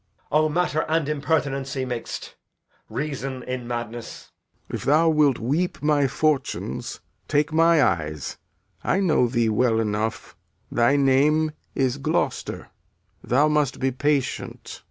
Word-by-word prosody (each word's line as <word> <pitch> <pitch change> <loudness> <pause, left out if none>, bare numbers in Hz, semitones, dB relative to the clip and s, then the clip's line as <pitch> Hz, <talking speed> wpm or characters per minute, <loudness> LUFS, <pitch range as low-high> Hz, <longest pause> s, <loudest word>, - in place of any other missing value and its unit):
So. 150 - +4
Edg. - - +5
O, 155 - +2
matter 160 -1 +1
and 160 -2 +1
impertinency 140 -3 -1
mix'd! 120 -2 -5 0.6
Reason, 135 -3 -4
in 125 -1 -5
madness! 120 -1 -6 0.4
Lear. - - -5
If - - -9
thou 155 +4 +4
wilt 150 -5 +3
weep 150 +10 -1
my 150 -2 +3
fortunes, 150 +1 -1 0.3
take 150 +1 +1
my 165 -1 +5
eyes. 75 -3 -1 0.4
I 185 - +1
know 160 -10 +3
thee 120 -2 +1
well 110 +1 +2
enough; 110 0 -2 0.4
thy 120 +4 +3
name 145 +3 +3 0.2
is 135 0 0
Gloucester. 140 - -2 0.5
Thou 140 +5 +3
must 150 -3 +1
be 135 0 +1
patient. 145 +1 -2
140 Hz, 135 wpm, -24 LUFS, 125-150 Hz, 0.6 s, Edg